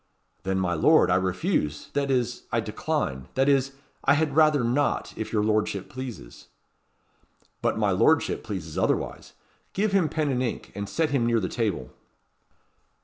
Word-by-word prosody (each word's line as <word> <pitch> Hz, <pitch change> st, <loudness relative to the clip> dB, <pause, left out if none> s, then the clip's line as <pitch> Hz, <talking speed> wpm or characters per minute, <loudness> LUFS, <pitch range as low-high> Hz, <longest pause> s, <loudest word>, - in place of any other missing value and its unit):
"Then, 95 Hz, 0 st, -1 dB
my 90 Hz, -2 st, 0 dB
lord, 80 Hz, -, +4 dB
I -, -, +4 dB
refuse 95 Hz, -, -1 dB
that 140 Hz, -1 st, 0 dB
is, 125 Hz, -3 st, -1 dB
I -, -, +2 dB
decline 65 Hz, -1 st, -2 dB
that 135 Hz, +1 st, +2 dB
is, 135 Hz, -1 st, +2 dB, 0.3 s
I 140 Hz, -, +5 dB
had 150 Hz, -2 st, 0 dB
rather 155 Hz, -4 st, +4 dB
not, 130 Hz, +5 st, 0 dB
if 110 Hz, -, -5 dB
your 105 Hz, -2 st, +1 dB
lordship 105 Hz, -2 st, 0 dB
pleases." 125 Hz, -, -8 dB, 1.1 s
"But -, -, 0 dB
my -, -, +2 dB
lordship -, -, +2 dB
pleases 90 Hz, -7 st, -5 dB
otherwise. -, -, -1 dB, 0.4 s
Give 205 Hz, +2 st, +1 dB
him 190 Hz, -5 st, +2 dB
pen 155 Hz, -3 st, 0 dB
and 125 Hz, -1 st, 0 dB
ink, 125 Hz, -3 st, -3 dB
and 100 Hz, 0 st, -5 dB
set 160 Hz, -3 st, 0 dB
him 125 Hz, -5 st, +1 dB
near 115 Hz, -1 st, +3 dB
the 95 Hz, -, -2 dB
table." 100 Hz, -, -2 dB
120 Hz, 160 wpm, -26 LUFS, 95-140 Hz, 1.1 s, I